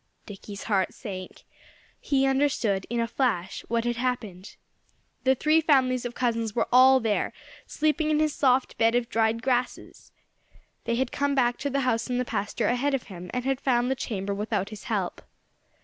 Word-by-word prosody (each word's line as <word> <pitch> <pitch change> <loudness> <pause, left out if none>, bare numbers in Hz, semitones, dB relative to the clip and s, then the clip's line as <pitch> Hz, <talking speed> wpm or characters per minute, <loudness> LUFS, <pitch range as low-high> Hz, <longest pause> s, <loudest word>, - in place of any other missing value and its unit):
Dickie's 200 -1 -9
heart 195 -4 0
sank. 185 -5 -8 0.6
He 270 -1 +1
understood, 265 -8 +1
in 235 +1 -1
a 230 - +1
flash, 220 -9 -1
what 230 0 0
had 240 -1 -1
happened. 220 -7 -4 0.7
The 265 0 +4
three 310 +5 +3
families 260 -5 +2
of 240 - -5
cousins 230 -3 -1
were 235 - +1
all 260 +1 +7
there, 220 -3 -1 0.3
sleeping 310 0 0
in 305 - +2
his 310 -1 +1
soft 260 -1 +1
bed 230 +1 +3
of 245 0 0
dried 230 0 +1
grasses! 250 -1 -2 0.7
They 235 - 0
had 260 +1 -1
come 285 0 0
back 245 -2 +2
to 285 - -2
the 275 0 0
house 240 -2 0
in 250 - 0
the 250 - 0
pasture 210 0 -2
ahead 270 +4 +1
of 265 - -3
him, 180 0 -9
and 250 0 -3
had 270 0 0
found 245 -1 +1
the - - +1
chamber 200 -6 -3
without 205 -1 -2
his 215 -1 -10
help. - - -2
245 Hz, 180 wpm, -26 LUFS, 220-265 Hz, 0.7 s, all